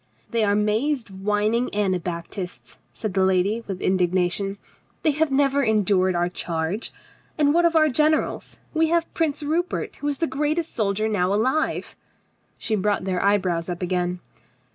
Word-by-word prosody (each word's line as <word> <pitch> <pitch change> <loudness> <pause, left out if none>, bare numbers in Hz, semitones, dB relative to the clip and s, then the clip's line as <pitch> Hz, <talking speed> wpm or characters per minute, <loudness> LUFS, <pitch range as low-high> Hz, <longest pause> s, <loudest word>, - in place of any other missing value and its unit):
"They 230 -1 +1
are 205 -1 +3
mazed 220 +4 0
whining 210 +5 0
Anabaptists," 180 -2 -3
said 215 -4 -5
the 190 0 +2
lady 190 +4 +2
with 190 -2 -5
indignation. 185 +2 +1 0.5
"They 310 - +4
have 310 +2 +1
never 275 0 +2
endured 200 -5 +2
our 175 0 +1
charge. 170 +3 -3 0.5
And 290 -1 +3
what 345 +1 +4
of 335 -1 +2
our 310 -1 +6
generals? 305 +3 0 0.2
We 320 0 +3
have 335 +1 0
Prince 310 -3 -1
Rupert, 330 +5 -2
who 290 - -4
is 285 -1 -1
the 330 - +1
greatest 305 +3 -1
soldier 215 -1 0
now 195 -4 +1
alive." 260 +10 0 0.6
She 220 - -1
brought 205 0 0
their 185 -1 -1
eyebrows 185 -4 +1
up 175 +1 -4
again. 180 0 -1
210 Hz, 155 wpm, -24 LUFS, 185-290 Hz, 0.6 s, our